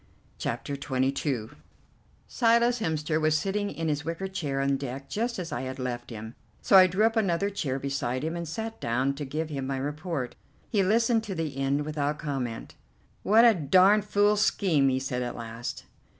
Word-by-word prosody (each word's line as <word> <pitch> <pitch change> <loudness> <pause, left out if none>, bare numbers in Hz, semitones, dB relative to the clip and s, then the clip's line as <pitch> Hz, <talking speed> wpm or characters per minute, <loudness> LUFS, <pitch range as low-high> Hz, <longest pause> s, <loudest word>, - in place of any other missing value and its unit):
CHAPTER 145 - -3
XXII 135 -3 -1 0.8
Silas 235 0 +3
Hemster 160 -4 -1
was 155 0 +3
sitting 200 +5 -1
in 165 -3 -4
his 150 -1 -1
wicker 165 +4 -3
chair 150 -8 -3
on 140 0 +2
deck 135 0 -6
just 235 +3 -1
as 175 -2 -5
I - - -2
had 130 0 -5
left 125 -2 -4
him, 110 -1 -7 0.3
so - - +3
I 185 -1 +9
drew 190 +4 +2
up 225 +1 +2
another 200 -2 +1
chair 140 -9 -2
beside 135 -2 -2
him 160 +2 -2
and 170 -1 -4
sat 220 +7 -5
down 130 +4 0
to 145 +1 -5
give 155 +4 -3
him 135 -3 -4
my 135 0 -2
report. 145 -1 -3 0.3
He 205 - +1
listened 225 +3 +2
to 195 - -4
the 160 -4 -3
end 135 +2 0
without 150 -1 -1
comment. 130 -7 -4 0.5
"What 225 +3 +5
a 230 - +7
darned 190 +5 +4
fool 205 0 +3
scheme," 175 -9 +3
he 130 0 +1
said 130 -1 -3
at 125 - -3
last. 115 0 -6
150 Hz, 185 wpm, -27 LUFS, 135-195 Hz, 0.8 s, I